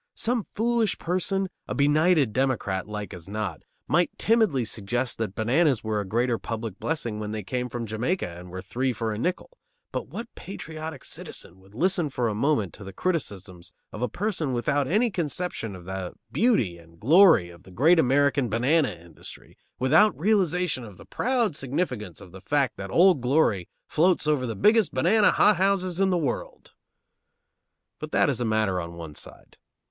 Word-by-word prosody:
Some 235 -2 -1
foolish 230 -1 +1
person, 190 +2 -1 0.2
a - - -3
benighted 145 -3 +3
Democrat 115 -8 -1
like 105 -1 -6
as 90 -1 -10
not, 100 -6 -4 0.3
might 170 +6 +3
timidly 210 - +2
suggest 120 +4 -2
that 105 -4 -3
bananas 130 +3 +2
were 110 -1 -1
a 100 - -7
greater 120 +3 0
public 110 -4 -5
blessing 120 -9 -2
when 105 0 -4
they 110 -1 -4
came 125 +5 -3
from 120 -1 -4
Jamaica 115 - -1
and 90 +1 -10
were 95 +1 -7
three 125 +6 -1
for 115 -1 -3
a 105 - -5
nickel, 185 - -3 0.3
but - - -4
what 230 0 -8
patriotic 160 -4 -8
citizen 90 - -6
would 95 +2 -20
listen 175 +2 +1
for 125 -3 -1
a 110 - -1
moment 110 - 0
to 105 - -11
the 95 - -8
criticisms 100 - -3 0.2
of 105 - -8
a 125 - 0
person 180 -9 -2
without 130 +4 0
any 215 - +2
conception 165 - -2
of 90 -1 -12
the 95 -1 -5 0.2
beauty 125 - +2
and 85 0 -19
glory 155 - +6
of 85 0 -15
the 95 - -16
great 155 - +4
American 140 -2 +2
banana 135 +7 +2
industry, 85 0 -12 0.2
without 160 - +4
realization 180 - +1
of 105 -5 -11
the - - -14
proud 240 - 0
significance 125 - -3
of 90 - -13
the 95 +1 -11
fact 140 -1 0
that 95 0 -7
Old 175 - +5
Glory 125 - +2 0.2
floats 175 +2 +2
over 145 -4 +1
the 115 - -4
biggest 215 - +3
banana 205 +11 +4
hothouses 190 -2 +2
in 195 -1 +3
the 180 - +2
world! 155 -5 -4 1.3
But - - -7
that - - +3
is - - -4
a - - 0
matter 110 -5 +1
on 85 0 -7
one 80 -3 -8
side. - - -11
130 Hz, 175 wpm, -26 LUFS, 105-175 Hz, 1.3 s, glory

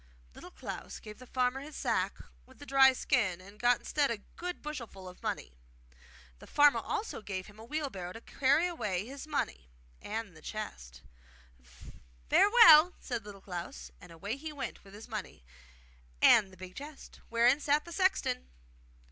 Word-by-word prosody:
Little - - -11
Klaus - - -7
gave 210 +1 -11
the 255 - -12
farmer 250 +1 0
his 290 +2 -9
sack - - 0 0.3
with 260 - -18
the 290 - -11
dry 270 -1 +7
skin, 235 -9 0
and 200 +3 -15
got 245 0 +4
instead 290 -2 0
a 230 - -1 0.2
good 360 +1 -5
bushelful 235 -11 -7
of 180 - -12
money. 65 - -4 0.9
The - - -13
farmer 290 0 +5
also 440 - -4
gave 190 -3 -5
him 210 0 -15
a - - -10
wheelbarrow 235 - -4
to 225 - -9
carry 280 +7 +2
away 210 - -2
his 275 +4 -8
money 65 - -3 0.3
and 215 -4 -5
the 155 - -14
chest. 60 - -7 1.3
'Farewell,' 360 -6 +8
said 240 -5 -4
Little 200 -1 -11
Klaus; 170 - -7
and - - -13
away 200 +9 -5
he 310 +2 -6
went 285 -2 -6
with 200 0 -14
his 215 - -10
money 215 - -7 0.7
and 205 - +6
the 185 - -16
big 185 +1 -9
chest, 290 +1 -10
wherein 235 +4 +4
sat 295 +1 +1
the 340 - -10
sexton. 370 - +1
235 Hz, 165 wpm, -31 LUFS, 195-290 Hz, 1.3 s, Farewell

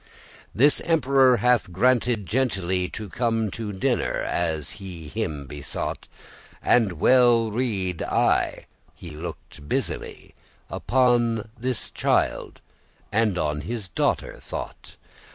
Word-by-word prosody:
This 140 +6 +4
emperor 135 -6 +4
hath 120 -7 +2
granted 120 +1 +2
gentilly 95 -6 0
To 110 - -6
come 115 0 -1
to 110 0 -5
dinner, 95 - 0
as 80 -3 -1
he 85 -5 -8
him 80 -9 -3
besought: 70 0 -5 0.6
And 110 -6 +3
well 120 +4 +4
rede* 100 -8 -1
I, - - +1 0.3
he 85 - -10
looked 75 -2 -9
busily - - -3
*guess, - - -29
know - - -3
Upon 120 -3 +2
this 125 0 -2
child, - - 0 0.5
and 110 -4 +2
on 75 -3 -1
his 100 +4 -5
daughter 80 - -1
thought. - - -7
110 Hz, 115 wpm, -24 LUFS, 90-120 Hz, 0.6 s, This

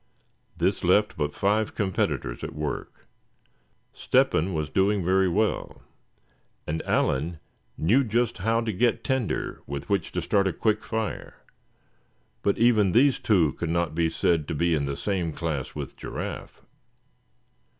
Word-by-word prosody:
This - - 0
left 105 +4 +3
but 75 -1 -2
five 105 +2 +1
competitors 95 - -1
at - - -6
work. 75 -1 -5 0.9
Step - - +2
hen 85 +5 +1
was 75 -3 -2
doing 95 +2 +1
very 95 +1 +3
well, 105 +5 -1 0.8
and 80 +2 -2
Allan 80 +4 0 0.4
knew 115 - +3
just 115 -1 0
how 115 +4 +1
to 115 -2 -2
get 115 +3 +1
tinder 130 -5 -2
with 70 0 -6
which 100 - 0
to 90 - -1
start 100 +2 +2
a 95 - -1
quick 110 -1 0
fire; 110 -2 -4 1.0
but 100 - +1
even 110 -5 +4
these 135 +3 +4
two 85 - +3
could 85 - -4
not 85 -1 0
be 80 0 +1
said 80 -2 +1
to 80 - -3
be 85 +3 +2
in 70 -3 0
the 70 0 -3
same 90 -4 -1
class 80 -6 -3
with - - -6
Giraffe. - - -7
95 Hz, 150 wpm, -26 LUFS, 80-110 Hz, 1.0 s, even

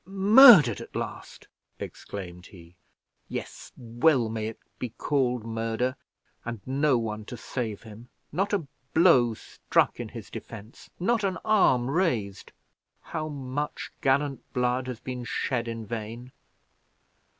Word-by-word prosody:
"Murdered 195 - +7
at - - -11
last!" - - -6 0.3
exclaimed 90 -2 -8
he. 85 -2 -16 0.5
"Yes, - - -7
well 120 +1 +2
may 110 -1 -3
it 110 - -7 0.2
be 125 - -3
called 125 -5 0
murder, 115 +3 -2 0.5
and 120 -2 -5
no 135 0 +2
one 110 -2 -4
to 120 - -8
save 110 -3 -5
him 110 +2 -12 0.2
not 195 +2 -1
a 195 -7 0 0.3
blow 130 -10 +5
struck - - 0
in - - -5
his - - -10
defense 110 +1 -10
not 225 +4 +1
an 190 -2 0
arm 160 - +3
raised. 130 - -1 0.5
How 155 -2 -5
much 145 0 -5
gallant 140 0 +1
blood 125 +1 0
has 125 -3 -5
been 125 -1 -6
shed 120 0 -2
in 115 -1 -5
vain! 115 +3 -6
125 Hz, 130 wpm, -27 LUFS, 115-150 Hz, 0.5 s, Murdered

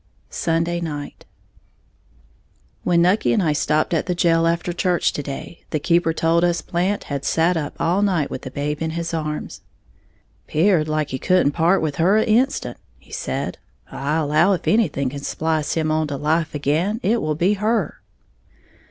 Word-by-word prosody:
Sunday 170 +1 -1
Night. 150 -3 -6 1.6
When 170 -1 +3
Nucky 185 +5 +3
and 210 - +2
I 155 -3 +2
stopped 155 +2 +1
at 165 - 0
the 180 - 0
jail 165 -1 +3
after 170 +1 -1
church 180 0 +1
to - - -3
day, 140 +4 -8
the 155 - -1
keeper 170 +1 +2
told 165 +1 +1
us 175 -1 +1
Blant 185 +4 -1
had 140 -1 -4
sat 165 +5 +2
up 150 -3 -3
all 180 +4 +1
night 180 -8 +1
with - - -5
the 130 - -7
babe 145 +3 -3
in 160 - -1
his 170 0 -3
arms. 155 -2 -4 0.9
"'Peared 160 -1 +2
like 155 -1 -1
he 130 - -3
couldn't 180 -4 +3
part 170 +4 +2
with 145 -3 -2
her 185 +6 +4
a' 220 - +3
instant," 245 +5 +1 0.2
he - - -22
said; - - -4 0.3
"I 140 +3 -2
allow 160 +4 +3
if 180 - -4
anything 150 - +2
can 140 +2 -6
splice 155 +1 -1
him 155 -1 0
on 155 0 +1
to 145 -1 -4
life 155 +2 0
again, 160 +10 0
it 230 +3 +2
will 155 0 -1
be 180 +6 +2
her." 210 -3 -1
165 Hz, 180 wpm, -21 LUFS, 150-180 Hz, 1.6 s, her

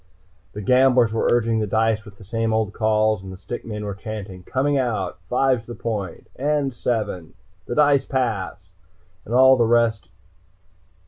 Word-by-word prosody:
The 105 - -6
gamblers 125 -1 +4
were 115 - 0
urging 115 -1 +2
the 105 - -1
dice 110 +1 +1
with 100 -1 -14
the 105 - -14
same 115 +2 -1
old 110 -2 -1
calls, 110 -1 +1
and 95 0 -9
the 95 - -9
stick 120 - -7
men 105 -2 -6
were 100 - -3
chanting: 100 -2 -7
"Coming 135 +9 0
out!" 125 -5 -1
"Five's 125 -2 +1
the 120 - -7
point!" 105 -6 -4
"And 145 -1 0
seven! 110 -9 -3 0.3
The 120 - -3
dice 145 -2 +3
pass!" 115 -8 -1 0.7
and 115 - -3
all 130 +1 +7
the 120 - +3
rest. 115 -6 +2
115 Hz, 170 wpm, -22 LUFS, 105-125 Hz, 0.7 s, all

